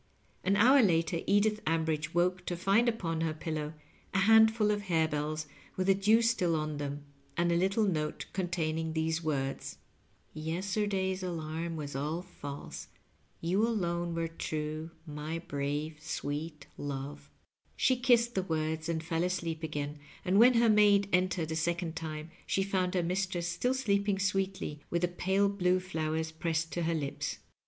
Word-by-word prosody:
An 195 +2 +3
hour 255 +7 +7
later 165 -4 +2
Edith 210 +1 +3
Ambridge 160 -1 0
woke 180 +1 +1
to 175 - -2
find 200 +7 +3
upon 165 -8 -2
her 160 -1 0
pillow 155 -1 -4 0.4
a 190 - +4
handful 220 0 +6
of 205 0 0
harebells 155 -2 0 0.3
with 185 - 0
the 195 - +6
dew 210 +4 +4
still 195 -8 +2
on 155 -1 -2
them, 145 0 -4 0.3
and 170 0 +2
a - - +3
little 195 +5 +2
note 155 -6 -1
containing 160 -3 -1
these 160 +1 0
words: 135 -3 -2 0.3
" - - -38 0.2
Yesterday's 190 +4 -1
alarm 165 -1 -3
was 145 -3 -5
all 155 +5 -2
false. 145 -6 -8 0.5
Yea 170 +2 -1
alone 175 -6 0
were 165 0 0
true, 155 -1 -4 0.2
xnj 155 +3 -5
brave 145 +2 -2
sweet 150 0 -4
love." 140 0 -5 0.5
She 260 - +3
kissed 240 -1 +3
the 190 - +1
words 160 -2 -2
and 160 -1 -1
fell 165 +1 -1
asleep 170 -3 -2
again, 150 -2 -4 0.3
and 190 +3 +4
when 245 +2 +7
her 230 0 +5
maid 205 -2 +5
entered 180 -3 +1
a - - -1
second 170 +1 -1
time 155 0 -5 0.2
she 195 - +1
found 190 -2 0
her 180 - +2
mistress 180 0 -1
still 210 +10 0
sleeping 200 -5 +1
sweetly, 190 -6 -1
with 170 0 0
the - - +4
pale 190 +3 +1
blue 185 -2 +2
flowers 160 -3 -2
pressed 165 0 -1
to 175 - -2
her 165 0 +1
lips. 140 -3 -3
170 Hz, 160 wpm, -31 LUFS, 155-195 Hz, 0.5 s, hour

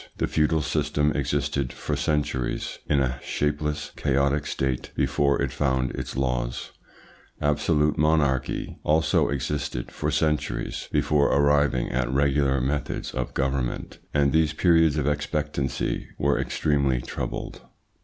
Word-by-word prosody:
The - - +1
feudal 75 0 +1
system 75 -1 +1
existed 70 -1 -1
for 75 - -3
centuries 75 -3 -1
in 70 -2 +3
a 65 -1 -1
shapeless, 75 0 -2
chaotic 70 +1 +1
state 65 -2 -2
before 70 0 +2
it - - 0
found 65 -3 0
its - - -5
laws; 60 -2 -2 0.7
absolute 75 +1 +1
monarchy 75 -4 +1
also 80 0 +2
existed 70 -2 -3
for - - -2
centuries 75 -1 -1
before 75 -2 +3
arriving 70 -3 +3
at 60 -1 0
regular 70 0 +2
methods 70 +3 -2
of 60 -1 -3
government, 65 -2 -2
and 70 -1 +2
these 80 -1 +3
periods 80 -2 +4
of 75 - 0
expectancy 75 -2 -1
were 70 0 +1
extremely 70 -4 +1
troubled." - - -5
70 Hz, 125 wpm, -25 LUFS, 65-75 Hz, 0.7 s, periods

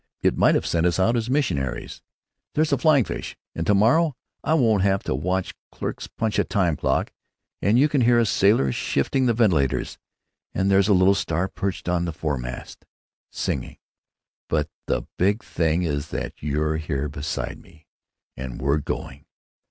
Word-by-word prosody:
It - - +3
might - - +4
have - - 0
sent 85 +1 +1
us 85 - +1
out 110 +6 +3
as 115 0 -1
missionaries.... 70 - -1 0.5
There's 155 0 +2
a - - +3
flying 145 -2 +5
fish; - - -6 0.2
and 80 - -4
to 105 - +4
morrow 130 +9 +3 0.3
I 155 - +2
won't 115 -9 +3
have 95 0 +1
to - - -1
watch 90 +7 -1 0.2
clerks - - -5
punch 110 -2 -2
a - - +4
time 90 -7 +1
clock; - - -1 0.5
and 105 +5 +3
you 140 +4 +5
can 145 -3 +1
hear 120 0 +4
a 120 - +4
sailor 100 - +3
shifting 125 - 0
the 120 - +2
ventilators; 85 - +1 0.6
and 95 +1 +1
there's 95 0 +4
a 105 - +4
little 95 +2 +5
star 90 -1 -1
perched 95 -1 -4
on 90 -1 +1
the 85 - -3
fore 75 -4 -2
mast; 60 0 -7 0.5
singing; - - -3 0.7
but 75 -2 0 0.2
the - - 0 0.2
big 100 +4 +2
thing 85 +1 0
is 75 -2 -2
that - - -4
you're 75 +2 0
here 75 -3 -2
beside 75 +2 -4
me, 80 -3 -20 0.5
and 65 -1 -6
we're 70 +3 +1
going. - - -6
95 Hz, 175 wpm, -24 LUFS, 75-115 Hz, 0.7 s, flying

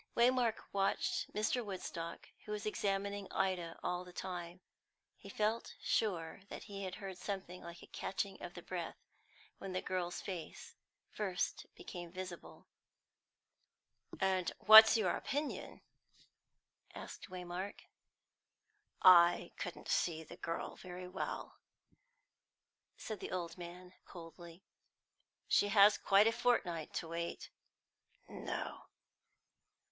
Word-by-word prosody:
Waymark 240 -1 +4 0.2
watched 195 0 0
Mr. 215 +4 0
Woodstock, 170 -4 -6 0.2
who 210 - -7
was 210 +1 -3
examining 200 -1 -1
Ida 175 -3 -1
all 180 0 -1
the 180 - -12
time; 175 -1 -5 0.6
he 200 - -12
felt 215 +3 -1
sure 180 -5 0
that - - -7
he 200 -3 -5
heard 190 0 -7
something 190 -3 -5
like 170 0 -10
a - - -9
catching 195 0 -4
of 175 - -7
the 175 - -8
breath 175 -3 -4 0.6
when 195 -1 -5
the 185 - -1
girl's 180 -1 -2
face 180 -5 -7 0.4
first 190 -4 -2
became 175 -1 -8
visible. 185 -1 -8 1.5
"And 190 -2 +1
what's 220 +1 +10
your 200 -5 +2
opinion?" 290 +2 -3 1.1
asked - - -8
Waymark. 180 +2 -5 1.2
"I 175 -1 +7
couldn't 175 - -6
see 160 -2 +1
the - - -11
girl 165 - -4
very 180 0 -8
well," 185 +1 -5 1.4
said 215 -3 -5
the - - -5
old 170 -2 -3
man 180 +1 -9
coldly. 170 0 -11 0.8
"She 205 - +4
hasn't 205 0 +6
quite 200 +1 +6
a 225 - +5
fortnight 225 -9 +1
to 165 - -2
wait." 170 +1 -4 0.8
"No." - - -5
185 Hz, 115 wpm, -36 LUFS, 175-205 Hz, 1.5 s, what's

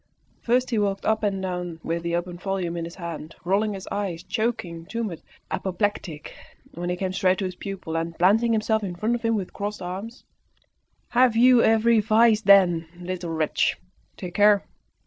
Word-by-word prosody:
First 250 +2 +1
he 225 - +1
walked 200 -1 -1
up 220 0 +2
and 195 -3 -1
down 180 -3 -4
with 170 +1 -2
the 170 0 -1
open 175 0 -4
volume 185 -3 -2
in 170 -1 -3
his 170 - -9
hand, 170 -3 -7
rolling 200 +3 +1
his 190 - -8
eyes, 185 -5 -3
choking, 195 -8 -3
tumid, 220 -8 -4 0.3
apoplectic. 190 -5 -3 0.4
Then 175 +1 -4
he 180 - 0
came 185 0 -3
straight 185 0 +2
to 195 - -2
his 185 - -3
pupil, 190 -4 -6
and, 165 0 -3
planting 220 +6 +4
himself 220 0 +1
in 180 -3 -4
front 215 +6 0
of 240 - -2
him 230 -1 +1
with 195 -4 -4
crossed 205 +1 -4
arms 195 +7 -6 0.9
"Have 245 -1 +4
you 245 +1 +6
every 225 +1 +4
vice, 220 +1 +4
then, 185 -6 +5
little 180 -1 -5
wretch? 160 -2 0 0.4
Take 180 -2 -7
care! 205 0 +4
195 Hz, 180 wpm, -24 LUFS, 175-220 Hz, 0.9 s, you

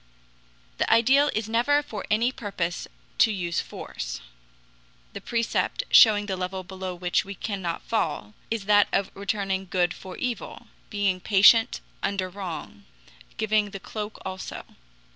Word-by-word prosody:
The - - +1
ideal 265 +6 +5
is 220 0 -1
never 245 +6 +2
for 215 -8 -7
any 230 +4 +2
purpose 190 -8 -4 0.3
to 225 - +6
use 175 -4 -1
force. - - -6 0.9
The - - -7
precept, 235 - -1
showing 210 -2 +7
the 195 -2 -2
level 185 +1 -4
below 185 0 -6
which 175 0 0
we 200 +1 -8
cannot 190 -5 -4
fall 150 - -2 0.2
is 225 -3 -2
that 205 0 +5
of 195 -1 0
returning 195 -1 -2
good 175 -2 +1
for 185 -1 -10
evil, 250 -2 -4 0.2
being 200 -3 0
patient 215 +5 +5 0.2
under 195 -2 -1
wrong, 175 - -7 0.5
giving 215 -1 +1
the 195 -1 -7
cloak 210 +2 -6
also. 190 0 -6
200 Hz, 140 wpm, -26 LUFS, 185-220 Hz, 0.9 s, showing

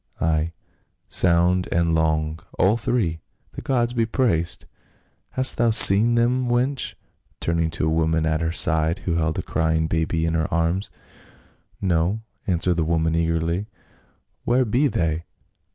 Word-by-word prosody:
"Ay, 80 0 0 0.6
sound 90 +1 +3
and 85 -1 +1
long, 80 0 0 0.2
all 100 +4 +3
three, 105 -9 -1 0.3
the - - -8
gods 120 -3 0
be 115 -2 +1
praised! 110 - -1 0.6
Hast 130 0 +1
thou 120 -1 +3
seen 110 +1 +6
them, 125 +2 +1
wench?" 125 +3 -1 0.4
turning 85 -1 0
to 80 - -2
a - - +1
woman 80 0 +1
at 80 0 0
her 80 0 -1
side, 80 0 +2
who 85 -2 0
held 80 -1 -1
a - - -2
crying 80 0 0
baby 80 0 -1
in 80 - -1
her 80 -1 -1
arms. 85 +3 -1 0.9
"No," 90 +3 0 0.3
answered 90 -1 0
the 85 - +1
woman 80 0 0
eagerly, 85 +3 -1 0.8
"where 125 +2 +2
be 125 +7 +2
they? 85 - -2
85 Hz, 145 wpm, -22 LUFS, 80-110 Hz, 0.9 s, seen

